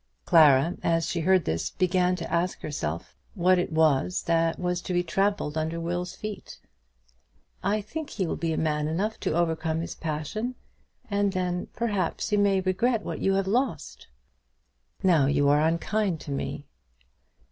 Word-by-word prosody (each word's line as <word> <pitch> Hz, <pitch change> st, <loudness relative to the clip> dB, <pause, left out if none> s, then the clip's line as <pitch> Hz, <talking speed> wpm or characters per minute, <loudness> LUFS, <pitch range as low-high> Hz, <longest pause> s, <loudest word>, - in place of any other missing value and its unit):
Clara, 160 Hz, -1 st, +5 dB
as 165 Hz, -1 st, +1 dB
she 175 Hz, -, -2 dB
heard 185 Hz, +2 st, +3 dB
this, 80 Hz, +1 st, -1 dB
began 180 Hz, 0 st, +1 dB
to 170 Hz, -2 st, -6 dB
ask 175 Hz, +2 st, 0 dB
herself 85 Hz, -, -4 dB, 0.2 s
what 185 Hz, -1 st, +4 dB
it 175 Hz, -, -2 dB
was 160 Hz, +1 st, +2 dB
that 165 Hz, -1 st, +1 dB
was 180 Hz, 0 st, -1 dB
to 185 Hz, -, -4 dB
be 175 Hz, 0 st, +2 dB
trampled 195 Hz, -4 st, 0 dB
under 160 Hz, +2 st, -2 dB
Will's 175 Hz, +1 st, -3 dB
feet. 215 Hz, -1 st, -7 dB, 1.0 s
"I 210 Hz, +2 st, 0 dB
think 295 Hz, +9 st, -6 dB
he 190 Hz, -, -2 dB
will -, -, -2 dB
be 165 Hz, -1 st, -2 dB
man 150 Hz, -1 st, 0 dB
enough 195 Hz, +8 st, -2 dB
to -, -, -1 dB
overcome 160 Hz, -1 st, 0 dB
his 170 Hz, -, -5 dB
passion; 165 Hz, -, -4 dB, 0.6 s
and 200 Hz, -1 st, +1 dB
then, 180 Hz, -1 st, -2 dB
perhaps, 210 Hz, -2 st, -1 dB
you 210 Hz, -, +3 dB
may 200 Hz, -1 st, +3 dB
regret 215 Hz, +5 st, +1 dB
what -, -, -5 dB
you 195 Hz, 0 st, +2 dB
have 195 Hz, 0 st, +1 dB
lost." 220 Hz, -, -2 dB, 1.0 s
"Now 165 Hz, -7 st, +4 dB
you 145 Hz, 0 st, +2 dB
are 145 Hz, +1 st, +4 dB
unkind 170 Hz, +3 st, 0 dB
to 145 Hz, -, -7 dB
me." 140 Hz, +1 st, -4 dB
175 Hz, 160 wpm, -26 LUFS, 160-195 Hz, 1.0 s, Clara